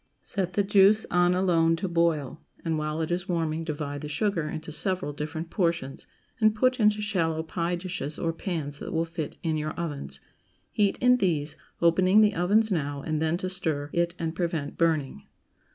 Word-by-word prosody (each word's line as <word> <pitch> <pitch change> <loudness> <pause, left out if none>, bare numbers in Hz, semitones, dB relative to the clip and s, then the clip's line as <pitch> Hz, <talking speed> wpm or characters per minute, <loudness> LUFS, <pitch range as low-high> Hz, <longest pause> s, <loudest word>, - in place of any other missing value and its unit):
Set 185 -3 -2
the 205 - +2
juice 200 +2 +5
on 175 0 +3
alone 165 -3 +3
to 190 - -3
boil, 165 -5 0 0.2
and 160 -2 0
while 155 +1 -2
it 160 - -3
is 180 +2 -2
warming 165 -2 -1
divide 145 -2 -4
the 150 - -6
sugar 165 -1 -1
into 155 0 -6
several 185 -1 -1
different 155 +3 -5
portions, 170 -7 -1 0.3
and 215 -1 +4
put 255 +3 +2
into 210 -1 +4
shallow 165 -7 0
pie 170 +2 -2
dishes 175 -4 -5
or 165 -1 -1
pans 155 -5 -4
that - - -6
will 165 0 +1
fit 165 -2 -5
in 160 -2 0
your 155 0 -3
ovens; 140 - -4 0.5
heat 205 -2 +2
in 250 0 +5
these, 155 -8 0 0.3
opening 185 +5 +5
the 210 -1 +4
ovens 205 +5 +2
now 145 -5 -2
and 155 -1 -1
then 160 +1 +1
to 185 - -3
stir 155 -6 -2
it 170 0 0
and 165 -1 -2
prevent 165 -5 -2
burning. 155 - 0
165 Hz, 185 wpm, -27 LUFS, 155-185 Hz, 0.5 s, juice